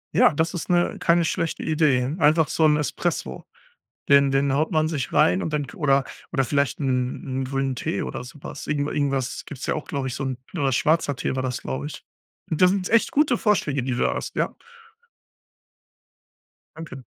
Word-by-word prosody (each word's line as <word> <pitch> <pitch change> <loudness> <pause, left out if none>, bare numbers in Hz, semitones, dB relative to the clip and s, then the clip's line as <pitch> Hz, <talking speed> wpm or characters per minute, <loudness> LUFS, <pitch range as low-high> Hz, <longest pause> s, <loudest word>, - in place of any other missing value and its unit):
Ja, - - +6
das 160 +4 0
ist 175 -1 -5
'ne 175 -1 +2
keine 170 0 +3
schlechte 165 0 -2
Idee. 150 -4 +2
Einfach 155 0 +4
so'n 155 -2 +3
Espresso. 65 - -3 0.6
Den 140 -1 +5
den 135 0 +2
haut 155 +6 +1
man 155 -1 +2
sich 150 -5 -3
rein 90 +2 +3
und - - -3
dann 150 -1 -1
oder 140 -6 +2 0.3
oder 135 -6 +1
vielleicht 140 +1 0
'n 130 0 -1
'n - - -1
grünen 135 0 -2
Tee 100 - -2
oder - - -5
so 130 +4 -12
was. - - -7
Irgend 145 -1 -1
irgendwas 135 -3 -1
gibt's 140 - -7
ja - - 0
auch, 155 - -5
glaub 140 -2 -2
ich 130 - -3
so'n 135 -2 -3 0.2
oder 140 -6 0
schwarzer 145 0 +1
Tee - - -2
war 130 - -1
das, 125 -2 -3
glaub 65 +2 -4
ich. - - -7 0.5
Das 180 +3 +4
sind 195 -2 -1
echt 230 0 +3
gute 280 -5 +3
Vorschläge, 145 - +1
die 130 - -2
du 120 - -1
da - - +1
hast, - - -5
ja. - - 0 2.2
Danke. 155 -5 -9
140 Hz, 190 wpm, -24 LUFS, 130-160 Hz, 2.2 s, Ja